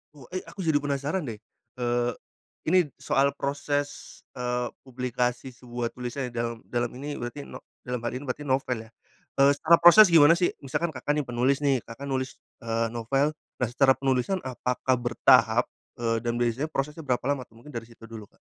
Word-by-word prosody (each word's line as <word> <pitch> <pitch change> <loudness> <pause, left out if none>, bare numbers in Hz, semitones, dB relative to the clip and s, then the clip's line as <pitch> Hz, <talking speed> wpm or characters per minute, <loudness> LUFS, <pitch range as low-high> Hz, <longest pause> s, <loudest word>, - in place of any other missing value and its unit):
Wo 135 -4 -14
eh 185 - -2
aku - - -14
jadi 160 -5 +1
penasaran 145 +5 -1
deh, 115 -6 -6 0.4
eee, 120 0 +1 0.6
ini 185 +3 +5 0.2
soal 140 +1 +2
proses, 145 +1 -3 0.2
eee, 125 0 -1 0.2
publikasi 125 0 -2
sebuah 120 -1 -4
tulisan 125 +1 -4
ya 125 - -9
dalam 115 0 -3
dalam 120 -1 -1
ini 145 +1 -4
berarti 120 +4 -6
no - - -10 0.2
dalam 125 -2 -5
hal 120 - -1
ini 130 +3 -5
berarti 130 +3 -3
novel 130 -2 0
ya, - - -21 0.5
eee, 140 +1 +7
secara 170 +3 +5
proses 175 +3 +9
gimana 165 0 +7
sih? 175 0 +1
Misalkan 160 +5 -2
Kakak 145 -1 -2
nih 150 - 0
penulis 130 +3 0
nih 135 -2 +3
Kakak 115 +4 -9
nulis, 130 0 -2 0.2
eee, 115 0 -1
novel 135 +6 +1 0.2
nah 125 - -1
secara 130 +1 +5
penulisan 135 +8 0
apakah 130 0 -1
bertahap, 120 -1 +4 0.3
eee, 115 -1 0
dan 120 0 -2
biasanya 120 +5 0
prosesnya 150 +2 -3
berapa 125 -1 0
lama 130 -3 -3
tuh? 115 - -24
Mungkin 150 - -11
dari 115 -3 -6
situ 115 -1 -18
dulu 110 -2 -9
Kak. - - -32
130 Hz, 185 wpm, -27 LUFS, 120-145 Hz, 0.6 s, proses